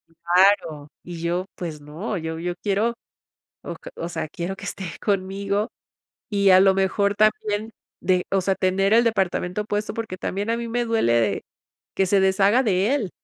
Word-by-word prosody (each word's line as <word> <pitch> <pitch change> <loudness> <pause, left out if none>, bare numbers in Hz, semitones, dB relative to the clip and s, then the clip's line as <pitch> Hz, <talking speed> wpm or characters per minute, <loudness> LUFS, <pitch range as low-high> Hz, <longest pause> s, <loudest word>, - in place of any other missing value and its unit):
Claro, 170 -3 +2 0.2
y 175 -2 -8
yo 175 +2 -1
pues 160 -4 -6
no, 165 +8 -5
yo 160 -1 -4
yo 175 +1 -3
quiero 210 +3 +1 0.7
o - - -6 0.2
o 170 - -4
sea, 155 - -4
quiero 175 +5 -4
que - - -10
esté 200 -1 -5 0.2
conmigo 200 +2 -1 0.6
y 200 -2 +3
a 185 - +8
lo 195 0 +5
mejor 200 +1 +1
también 215 +1 +1 0.3
de, 180 0 +1
o 195 - +3
sea, 190 +1 +1
tener 195 +2 +1
el 235 - +6
departamento 195 -2 0
puesto, 210 0 -2
porque 225 -5 -4
también 200 +4 -3
a 230 - +2
mí 235 0 -4
me 240 +1 0
duele 225 - +2
de 115 -4 +1 0.5
que 190 - +2
se 195 +2 +3
deshaga 195 +5 +4
de 205 +3 +2
él. 225 -10 -2
195 Hz, 175 wpm, -23 LUFS, 180-210 Hz, 0.7 s, a